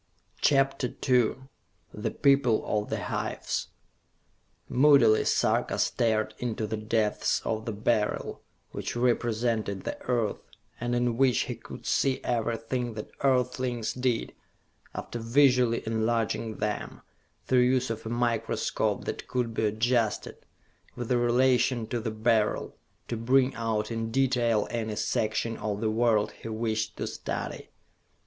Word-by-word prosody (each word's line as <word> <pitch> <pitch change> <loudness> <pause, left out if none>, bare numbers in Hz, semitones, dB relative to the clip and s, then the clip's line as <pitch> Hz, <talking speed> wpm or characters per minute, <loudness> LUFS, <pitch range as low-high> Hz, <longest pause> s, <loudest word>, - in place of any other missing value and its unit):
CHAPTER 135 -2 +2
II 125 -4 +4 0.6
The 105 - -2
People 135 -5 +3
of 105 -1 -1
the - - -2
Hives - - -3 1.0
Moodily 130 -5 +5
Sarka - - +1
stared 110 -2 +1
into 115 -3 -2
the 110 +1 -3
depths 110 0 0
of 110 0 -2
the 115 - -2
Beryl, 105 0 -1 0.3
which - - -4
represented 115 -4 0
the - - -5
Earth, 120 -4 0 0.4
and 120 +1 -1
in 120 -1 +1
which 130 -3 +3
he - - -2
could - - -11
see 135 -1 +1
everything 120 0 -2
that 105 - -7
earthlings 125 -3 0
did, 125 -2 -1 0.6
after 120 - -5
visually 125 0 +3
enlarging 110 0 -1
them, 105 0 -3 0.4
through 130 - +3
use 125 0 +2
of 110 -1 -5
a 110 - -5
microscope 120 -1 -1
that - - -5
could 120 -2 -1
be 110 -1 +1
adjusted, 115 +1 -1 0.5
with 120 0 -5
relation 120 0 +3
to 120 +2 -3
the 115 0 -3
Beryl, 110 0 +1 0.3
to 120 - -3
bring 130 +3 +3
out 110 -1 -2
in 115 0 -2
detail 120 -3 +2
any 110 -2 -2
section 110 +2 -1
of 105 -1 -3
the 110 0 0
world 110 -2 +2
he - - -11
wished 110 -1 -2
to - - -2
study. - - -5
115 Hz, 130 wpm, -28 LUFS, 110-125 Hz, 1.0 s, Moodily